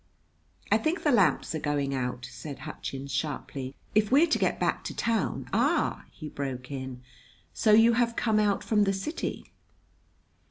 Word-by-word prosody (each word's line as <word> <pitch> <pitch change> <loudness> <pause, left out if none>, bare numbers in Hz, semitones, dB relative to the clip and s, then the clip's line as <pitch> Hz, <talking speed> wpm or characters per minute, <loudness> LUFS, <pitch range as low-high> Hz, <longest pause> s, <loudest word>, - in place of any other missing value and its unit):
"I - - +5
think 330 +3 -1
the 295 - +3
lamps 200 - +3
are 160 - -2
going 145 -2 -1
out," 125 -1 -3
said 125 +4 -8
Hutchins 135 +1 -6
sharply. 135 -1 -3 0.2
"If 215 +1 +3
we're 290 +5 +6
to 320 - +1
get - - +1
back - - 0
to - - -5
town 230 -1 -1
" - - -20
"Ah!" - - +1
he 155 - -9
broke 135 -3 -5
in. 130 -2 -6 0.5
"So 215 - +2
you 225 +2 +7
have 235 0 +1
come 220 -2 +2
out 205 -2 +1
from 210 -2 +3
the 195 - +1
city?" 195 - -4
155 Hz, 170 wpm, -28 LUFS, 135-225 Hz, 0.5 s, you